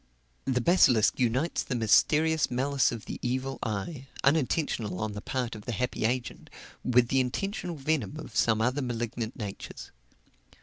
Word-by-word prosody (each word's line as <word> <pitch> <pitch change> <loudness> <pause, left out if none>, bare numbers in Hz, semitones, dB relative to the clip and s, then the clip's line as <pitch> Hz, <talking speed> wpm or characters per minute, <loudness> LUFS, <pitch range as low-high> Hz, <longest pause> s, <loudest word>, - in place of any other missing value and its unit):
The 125 -2 +1
basilisk 125 - +4
unites 130 +7 +1
the 125 - -3
mysterious 150 +7 +3
malice 135 +2 +1
of 115 -2 -6
the - - -6
evil 130 +2 -2
eye, 120 - -4 0.2
unintentional 140 - +1
on 110 0 -2
the 105 0 -6
part 125 0 -2
of 110 -2 -9
the 120 - -3
unhappy 115 0 -1
agent, 120 0 -2 0.3
with 125 -1 +3
the 135 - +3
intentional 175 - -2
venom 145 -4 -1
of 155 -7 -9
some 110 -1 +3
other 125 +5 +1
malignant 120 -2 -3
natures. 105 -5 -7
125 Hz, 150 wpm, -28 LUFS, 115-140 Hz, 0.3 s, basilisk